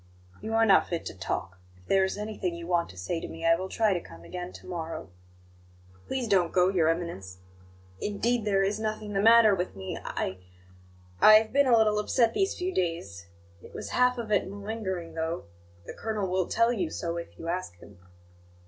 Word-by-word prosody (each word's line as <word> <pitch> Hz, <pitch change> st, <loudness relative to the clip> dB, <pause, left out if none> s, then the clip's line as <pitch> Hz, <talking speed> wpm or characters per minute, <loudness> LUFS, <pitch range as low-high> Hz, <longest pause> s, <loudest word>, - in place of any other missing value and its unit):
"You 220 Hz, +1 st, -3 dB
are 225 Hz, 0 st, +5 dB
not 200 Hz, -, +5 dB
fit 170 Hz, -2 st, -3 dB
to -, -, -5 dB
talk. 95 Hz, 0 st, -4 dB, 0.2 s
If 90 Hz, -, -23 dB
there 195 Hz, -, +3 dB
is 190 Hz, -, -1 dB
anything 210 Hz, -4 st, -3 dB
you 170 Hz, 0 st, -7 dB
want 175 Hz, -1 st, 0 dB
to 95 Hz, -, -13 dB
say 90 Hz, -, -3 dB
to -, -, -6 dB
me, 165 Hz, 0 st, -7 dB
I 165 Hz, -, +6 dB
will 185 Hz, +2 st, -5 dB
try 215 Hz, -1 st, +2 dB
to 175 Hz, -, -2 dB
come 85 Hz, -, -13 dB
again 180 Hz, -, -6 dB
to -, -, -12 dB
morrow." 165 Hz, -, -6 dB, 1.0 s
"Please 260 Hz, -3 st, -2 dB
don't 185 Hz, -5 st, +3 dB
go, 180 Hz, 0 st, +4 dB
Your 175 Hz, -5 st, +2 dB
Eminence 165 Hz, -, -3 dB, 0.6 s
indeed, 230 Hz, +3 st, 0 dB
there 195 Hz, -2 st, +2 dB
is 205 Hz, +2 st, -1 dB
nothing 215 Hz, -1 st, -3 dB
the 195 Hz, -, +1 dB
matter 225 Hz, -1 st, +7 dB
with 180 Hz, -, -2 dB
me. 95 Hz, -1 st, -6 dB
I 95 Hz, 0 st, -3 dB, 0.8 s
I 215 Hz, -, +9 dB
have 220 Hz, +2 st, +3 dB
been 280 Hz, 0 st, +4 dB
a 240 Hz, -2 st, +6 dB
little 215 Hz, -1 st, +3 dB
upset 230 Hz, +2 st, +2 dB
these 390 Hz, +4 st, 0 dB
few 370 Hz, +1 st, -2 dB
days; 130 Hz, -, -3 dB, 0.3 s
it -, -, -14 dB
was -, -, -6 dB
half 250 Hz, 0 st, +3 dB
of 230 Hz, -3 st, -5 dB
it 200 Hz, -2 st, +2 dB
malingering, 200 Hz, -4 st, -5 dB
though 165 Hz, +1 st, -3 dB, 0.4 s
the -, -, -7 dB
colonel 215 Hz, -3 st, -3 dB
will 185 Hz, -1 st, 0 dB
tell 230 Hz, +1 st, +2 dB
you 325 Hz, +6 st, -1 dB
so 170 Hz, -, -4 dB
if 170 Hz, -, -8 dB
you 165 Hz, -, -8 dB
ask 175 Hz, -, -3 dB
him." 95 Hz, +1 st, -16 dB
190 Hz, 205 wpm, -28 LUFS, 165-220 Hz, 1.0 s, I